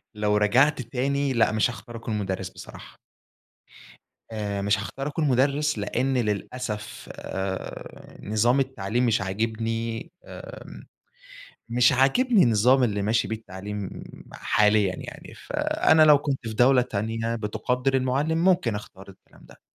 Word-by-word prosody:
لو 105 0 +1
رجعت 130 +7 +3
تاني، 135 +3 -1
لأ، 115 -2 +3
مش 110 +3 +2
هاختار 120 0 -9
أكون 115 -1 -4
مُدرّس 95 -2 -3
بصراحة. - - -12 1.3
آآ، 100 -2 -3
مش 100 +2 +2
هاختار 135 +7 -5
أكون 150 0 -1
مُدرّس، 140 +2 +1
لأن 125 +6 -1
للأسف، 105 0 -4
آآ 95 0 -6
نظام 115 +6 +2
التعليم 125 -2 -1
مش 110 -4 +2
عاجبني، 115 +3 -3
آمم، - - -11 0.8
مش 120 +1 +4
عاجبني 200 - +3
النظام 120 +4 +4
اللي 100 -3 -1
ماشي 110 +3 +1
بيه 110 - -2
التعليم 100 -1 -7 0.4
حاليًا 105 -3 +2
يعني، - - -10
فأنا 160 0 +2
لو 150 -2 +7
كنت 140 -2 -2
في 110 - -5
دولة 125 +2 +5
تانية 115 +1 -3
بتُقدِّر 125 +5 -1
المُعلِّم، 135 +5 +1
ممكن 175 - +2
أختار 100 -2 -9
الكلام 95 - -18
ده. - - -18
115 Hz, 130 wpm, -25 LUFS, 105-135 Hz, 1.3 s, لو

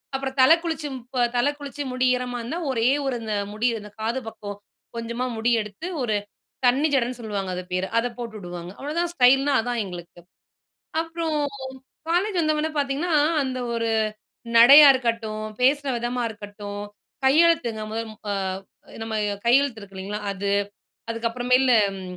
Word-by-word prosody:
அப்பறம் 270 0 -4
தலை 285 +6 +8
குளிச்சு 320 -2 -3 0.5
தலை 265 +4 +3
குளிச்சு 285 0 -5
முடி 255 0 +1
ஈரமா 250 -1 -4
இருந்தா 280 +10 -4
ஒரே 230 0 +2 0.2
ஒரு 260 - 0
இந்த 215 -1 -2 0.2
முடி 220 +3 0
இந்த 210 - -11
காது 230 +4 -1
பக்கம் 205 -2 -8 0.4
கொஞ்சமா 235 +2 -3
முடி 230 +2 +1
எடுத்து 210 - -7
ஒரு 235 -4 0 0.5
தண்ணி 270 +5 +4
ஜடன்னு 250 -2 +1
சொல்லுவாங்க 205 -4 -4
அது 180 - -4
பேர, 185 +1 0
அத 230 +1 +2
போட்டு 235 -2 -6
உடுவாங்க. 175 -1 -7
அவளதான் 330 +5 -2
ஸ்டைல்ன்னா 270 0 +4
அதான் 240 +1 -2
எங்களுக்கு. 175 -1 -9 0.8
அப்புறம் 330 -1 -3 0.8
காலேஜ் 375 +4 +1
வந்தவுனே 310 0 +1
பாத்தீங்கன்னா, 285 +5 -1 0.3
அந்த 260 -1 -3 0.2
ஒரு 230 0 -1 0.7
நடையா 280 +6 +10
இருக்கட்டும், 230 -4 -2 0.2
பேசுற 280 +3 +3
விதமா 245 +1 -2
இருக்கட்டும், 205 -1 -8 0.4
கையெழுத்துங்க 270 -7 +3
முதல் 225 0 -3 0.2
அ - - 0 0.7
நம்ம 225 0 -4 0.3
கையெழுத்து 245 -2 +3
இருக்கு 195 -1 -12
இல்லேங்களா! 200 +3 -5
அது. 200 +1 -2 0.6
அதுக்கப்புறமேலு 245 +2 +2
அம் 195 -1 -7
245 Hz, 140 wpm, -24 LUFS, 215-275 Hz, 0.8 s, நடையா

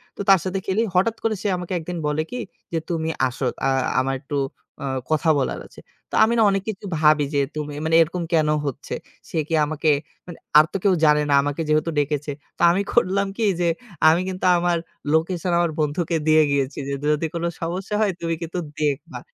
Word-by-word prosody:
তো - - -5
তার 195 -2 +7
সাথে 190 +1 -2
খেলি, 195 +4 +1
হঠাৎ 220 +5 +3
করে 220 -1 +1
সে 210 - -1
আমাকে 180 +1 -5
১ 165 - -5
দিন 175 - -3
বলে 150 +1 0
কি? 250 - -4 0.3
যে 165 - -1
"তুমি 160 -1 -1 0.2
আসো। 125 +1 -4 0.2
আ - - +3 0.3
আমার 135 +1 0
একটু 145 0 -4 0.5
অ - - -3 0.3
কথা 155 +1 +2
বলার 130 - -2
আছে।" - - -15 0.3
তো - - -3
আমি 230 +2 +3
না 225 - +5
অনেক 195 0 -1
কিছু 205 -1 -6
ভাবি 150 -1 +4
যে 140 - +3
তুমি 150 -1 -4
মানে 160 0 +2
এরকম 170 +2 0
কেন 155 -2 +3 0.2
হচ্ছে? 140 - -4 0.3
সে - - -4
কি 165 - -4
আমাকে 155 +1 -1 0.4
মানে 175 - -9 0.2
আর 155 - +8
তো - - 0
কেউ 195 -2 +4
জানে 150 0 +4
না, - - +3
আমাকে 145 +3 -2
যেহেতু 155 +2 +2
ডেকেছে। 145 0 -1 0.3
তো - - -8
আমি 190 +3 +1
করলাম 200 -3 +2
কি? 225 - +1
যে 175 - +2 0.4
আমি 170 +3 +3
কিন্তু 185 0 -4
আমার 175 0 +1 0.4
লোকেশন 170 +2 0
আমার 170 -2 +1
বন্ধুকে 160 +3 0
দিয়ে 155 0 +6
গিয়েছি, 140 0 -1
যে 140 - -2 0.2
যদি 150 +2 -1
কোনো 170 0 -1
সমস্যা 185 +5 -3
হয় 205 -3 +3
তুমি 165 -1 -1
কিন্তু 170 +2 -4 0.2
দেখবা। 145 -2 -2
165 Hz, 210 wpm, -22 LUFS, 150-185 Hz, 0.5 s, আর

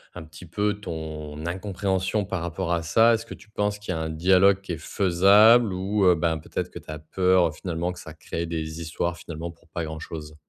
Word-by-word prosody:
un - - -7
petit 80 +2 -13
peu 105 +5 0
ton 80 -2 -6
incompréhension 95 +2 -1
par 95 -2 -3
rapport 85 +1 -2
à 85 -1 -1
ça? 115 +8 +5
Est-ce 115 0 -1
que - - -8
tu 105 - -15
penses 105 -1 -1
qu'il 105 -3 -4
y - - -3
a - - -3
un 80 - -3
dialogue 95 +4 +4
qui 100 -3 -6
est 80 - -4
faisable 100 +7 +5
ou 95 +2 -1
heu, 90 -1 +6
ben, 80 0 0
peut-être - - -4
que - - -9
tu - - -18
as 75 - -6
peur 90 +1 +2
finalement 85 +1 -3
que - - -12
ça 80 - -10
crée 85 +1 -5
des 80 0 -4
histoires 85 +2 -2
finalement 85 -1 -7
pour 85 -1 -17
pas 85 0 -4
grand-chose? 80 -1 -7
85 Hz, 225 wpm, -25 LUFS, 80-95 Hz, -, heu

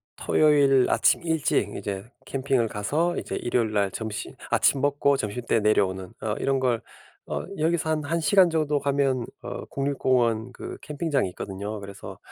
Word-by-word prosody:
토요일 140 -4 +4
아침 - - +3
일찍 150 - 0
이제 100 -1 -4 0.2
캠핑을 130 -3 +1
가서 150 +13 -1
이제 - - -4
일요일 120 -2 0
날 100 -1 +2
점심 110 +2 -5 0.2
아침 135 - +3
먹고 140 0 +2
점심 115 -1 -3
때 115 - +3
내려오는 95 -3 +1
어 110 -1 -1
이런 135 -1 +1
걸 125 -3 +1 0.5
어 - - -2 0.2
여기서 160 0 +1
한 155 -1 0
1 165 +3 0
시간 185 +1 +5
정도 150 -2 +1
가면 140 -3 +1 0.2
어 - - -5
국립공원 125 -4 0
그 - - -8
캠핑장이 150 - -1
있거든요. 100 +3 -6
그래서 100 -1 -9
130 Hz, 315 characters per minute, -25 LUFS, 105-145 Hz, 0.5 s, 시간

